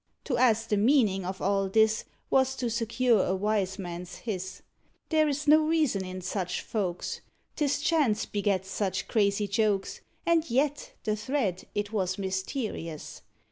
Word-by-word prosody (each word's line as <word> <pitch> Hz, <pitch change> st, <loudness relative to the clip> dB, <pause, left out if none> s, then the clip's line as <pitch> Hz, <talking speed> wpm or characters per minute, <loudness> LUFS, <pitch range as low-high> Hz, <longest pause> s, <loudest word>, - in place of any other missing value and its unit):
To 265 Hz, -, -1 dB
ask 225 Hz, -3 st, +3 dB
the 210 Hz, -, +2 dB
meaning 215 Hz, -4 st, +3 dB
of 190 Hz, +1 st, -4 dB
all 195 Hz, 0 st, +1 dB
this 220 Hz, +2 st, +3 dB, 0.3 s
Was 265 Hz, 0 st, +3 dB
to 245 Hz, -3 st, -2 dB
secure 230 Hz, -1 st, +2 dB
a 185 Hz, -, 0 dB
wise 195 Hz, -1 st, 0 dB
man's 175 Hz, -2 st, -6 dB
hiss; 190 Hz, -4 st, -5 dB, 0.5 s
There 310 Hz, -1 st, +3 dB
is 290 Hz, +1 st, -2 dB
no 310 Hz, +2 st, +7 dB
reason 305 Hz, -12 st, +2 dB
in 185 Hz, 0 st, -6 dB
such 180 Hz, -1 st, -2 dB
folks. 185 Hz, -5 st, -3 dB, 0.3 s
'Tis 285 Hz, -2 st, +1 dB
chance 295 Hz, -9 st, +2 dB
begets 195 Hz, -2 st, -1 dB
such 190 Hz, -2 st, -1 dB
crazy 205 Hz, -1 st, +2 dB
jokes, 200 Hz, -1 st, 0 dB, 0.2 s
And 335 Hz, -3 st, +2 dB
yet 290 Hz, -, 0 dB
the 215 Hz, -1 st, 0 dB
thread 210 Hz, -5 st, -1 dB
it 205 Hz, 0 st, -2 dB
was 190 Hz, -3 st, 0 dB
mysterious. 190 Hz, -, -4 dB
210 Hz, 150 wpm, -28 LUFS, 190-255 Hz, 0.5 s, no